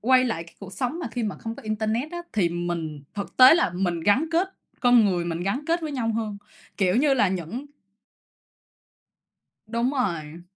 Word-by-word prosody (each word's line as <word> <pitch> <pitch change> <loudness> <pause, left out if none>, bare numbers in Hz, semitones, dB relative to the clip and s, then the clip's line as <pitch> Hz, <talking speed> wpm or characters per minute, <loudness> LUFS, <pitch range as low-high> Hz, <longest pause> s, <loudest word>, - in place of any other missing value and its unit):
quay 255 +2 +4
lại 170 -9 -2
cái 165 - -18
cuộc 195 -2 -10
sống 260 - -2
mà 350 - -4
khi 245 - -3
mà 210 -3 -2
không 225 0 -5
có - - -11
internet 220 +6 -1
á, 345 - -4
thì 200 -6 +2
mình 170 -3 -4
thực 200 - -6
tế 255 +3 +9
là 335 - +2
mình 175 -2 -1
gắn 205 - +3
kết 350 +4 +2 0.3
con 245 -2 +6
người 180 -4 +1
mình 170 -1 -3
gắn 250 +10 -2
kết 335 +1 +1
với 310 -2 -4
nhau 230 -4 -1
hơn, 215 -3 -3 0.4
kiểu 190 0 +2
như 275 +2 +4
là, 215 -7 +3
những 190 - -4 2.0
Đúng 235 +3 0
rồi. 170 - -2
215 Hz, 195 wpm, -25 LUFS, 175-255 Hz, 2.0 s, tế